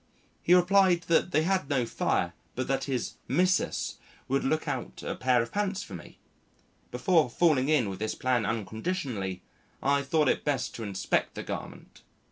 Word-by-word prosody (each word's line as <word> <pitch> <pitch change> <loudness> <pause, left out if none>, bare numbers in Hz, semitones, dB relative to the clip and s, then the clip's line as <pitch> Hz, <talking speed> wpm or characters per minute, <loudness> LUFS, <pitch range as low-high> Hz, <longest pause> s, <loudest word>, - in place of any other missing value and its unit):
He 175 - +5
replied 180 -1 +4
that 165 +1 +3
they 155 -3 +2
had 185 -3 0
no 130 -4 +1
fire - - 0 0.2
but 130 - -2
that 135 0 0
his 130 -3 -3
"missus" 185 +1 +1 0.3
would 135 +1 +1
look 155 +3 0
out - - -4
a - - -2
pair 125 -2 +2
of 115 - -9
pants 205 -1 -1
for 100 - -11
me. 85 -3 -10 0.7
Before 155 +3 +2
falling 145 -1 +2
in 145 -8 +3
with 95 -1 -5
this 110 +1 -2
plan 125 -3 +1
unconditionally, 110 - -3 0.4
I 140 +1 +2
thought 150 +2 +1
it - - +1
best 140 -4 -1
to 115 - -6
inspect 100 -3 -1
the - - -5
garment. - - -8
135 Hz, 170 wpm, -28 LUFS, 115-175 Hz, 0.7 s, He